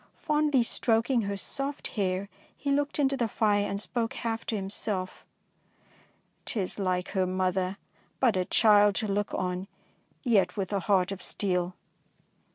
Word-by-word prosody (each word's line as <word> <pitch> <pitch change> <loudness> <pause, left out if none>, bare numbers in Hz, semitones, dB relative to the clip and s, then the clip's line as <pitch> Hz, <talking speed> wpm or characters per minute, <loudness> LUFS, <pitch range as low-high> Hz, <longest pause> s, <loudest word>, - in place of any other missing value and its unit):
Fondly 300 -5 +2
stroking 230 +2 +2
her 200 -1 -3
soft 275 +8 -3
hair, 195 -2 -1 0.3
he 280 - -2
looked 285 +1 0
into 275 -2 +2
the 240 -4 0
fire 205 -1 +1
and 200 - -2
spoke 230 +2 -2
half 230 -1 -3
to 225 - -1
himself, 195 -1 -2 0.6
— - - -34
'T 235 - -1
is 190 +1 -2
like 185 -1 0
her 190 -2 0
mother; 185 +1 0 0.4
but 240 -6 +3
a 185 -1 +1
child 205 0 +5
to 215 - 0
look 205 0 -1
on, 180 +1 -2 0.6
yet 220 -6 +2
with 195 0 -2
a 200 - +2
heart 190 -1 +2
of 195 -2 -5
steel." 180 -2 -1
205 Hz, 160 wpm, -28 LUFS, 185-230 Hz, 0.6 s, child